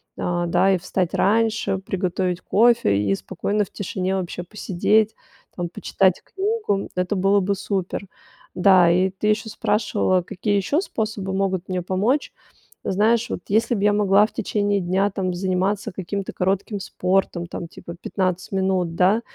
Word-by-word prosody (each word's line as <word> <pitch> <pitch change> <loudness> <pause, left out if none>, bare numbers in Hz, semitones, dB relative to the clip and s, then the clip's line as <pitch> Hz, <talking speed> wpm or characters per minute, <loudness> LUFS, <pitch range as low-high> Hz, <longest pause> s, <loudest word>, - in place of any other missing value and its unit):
А, 175 0 -1
да, 190 +3 +3
и 190 - +3
встать 180 0 -2
раньше, 215 -1 +1
приготовить 185 -1 -2
кофе 230 - +3
и 100 -1 +1
спокойно 200 - -2
в - - -21
тишине 190 -1 -3
вообще 180 -1 -4
посидеть, 210 +3 +1 0.4
там 175 -1 -3
почитать 190 +1 +1
книгу. 400 - -2
Это 180 +2 0
было 195 +1 +3
бы 200 +1 0
супер. 195 0 -3 0.5
Да, 180 -2 +5
и 185 +2 +3
ты 190 +2 -6
ещё 215 +1 0
спрашивала, 205 -3 +1
какие 195 +4 -2
ещё 205 - +1
способы 215 - -3
могут 190 -2 -1
мне 185 -1 -2
помочь. 205 - 0 0.5
Знаешь, 220 +4 +2
вот - - -2
если 220 +4 +2
б 200 - -2
я 210 - +5
могла 205 0 +4
в - - -20
течение 205 -2 0
дня 190 +3 +1
там 185 -2 -2
заниматься 190 +2 -1
каким-то 195 +2 -4
коротким 195 +3 -1
спортом, 185 -2 -1
там 170 - -6
типа 170 +1 -10
15 185 -2 -2
минут, 190 -3 0
да. 190 +6 +3
190 Hz, 155 wpm, -22 LUFS, 180-205 Hz, 0.5 s, Да